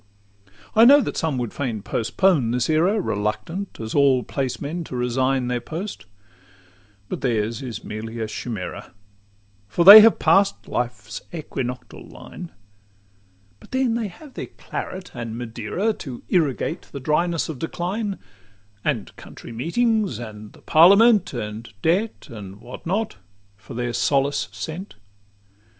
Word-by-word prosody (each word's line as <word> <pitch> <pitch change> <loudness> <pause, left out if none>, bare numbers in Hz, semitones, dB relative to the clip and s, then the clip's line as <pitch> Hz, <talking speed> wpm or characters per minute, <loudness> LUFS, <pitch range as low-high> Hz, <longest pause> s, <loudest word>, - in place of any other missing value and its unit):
V - - -27 0.3
I 225 - +9
know 285 +4 +9
that - - -3
some 160 -5 -1
would 120 -3 -3
fain 115 -7 -3
postpone 135 - +1
this 125 +5 0
era, 180 +8 +3
Reluctant 165 - -3
as 110 -1 -5
all 135 -3 +4
placemen 140 +5 -3
to 130 - -7
resign 130 +1 0
Their 125 -1 -1
post; 175 - -6 1.0
but - - -5
theirs 115 -2 -1
is 120 -5 -6
merely 110 +2 -6
a 110 - -1
chimera, 110 -5 -6 0.7
For 140 +12 +1
they 205 +3 +14
have 225 +1 +6
pass'd 200 0 +3
life's 105 -4 -4
equinoctial 130 -6 -5
line: 175 -2 -10 1.1
But - - -17
then 260 -2 +1
they 230 -2 -1
have 270 - -13
their - - -6
claret 185 0 -7
and 115 -2 -5
Madeira 120 - -2
To 130 - -8
irrigate 160 -2 0
the 140 - -6
dryness 165 +4 0
of 155 -5 -6
decline; 190 +5 -3 0.7
And 130 -9 -2
county - - -11
meetings, 200 - 0
and 110 -2 -9
the - - -19
parliament, 200 +5 +6
And 110 -1 -6
debt, 190 +7 0
and 105 -7 -9
what 120 +9 -10
not, 210 +5 -1 0.4
for 100 +5 -12
their 120 0 -2
solace 140 -5 +1
sent. 155 - -7
135 Hz, 140 wpm, -23 LUFS, 115-185 Hz, 1.1 s, they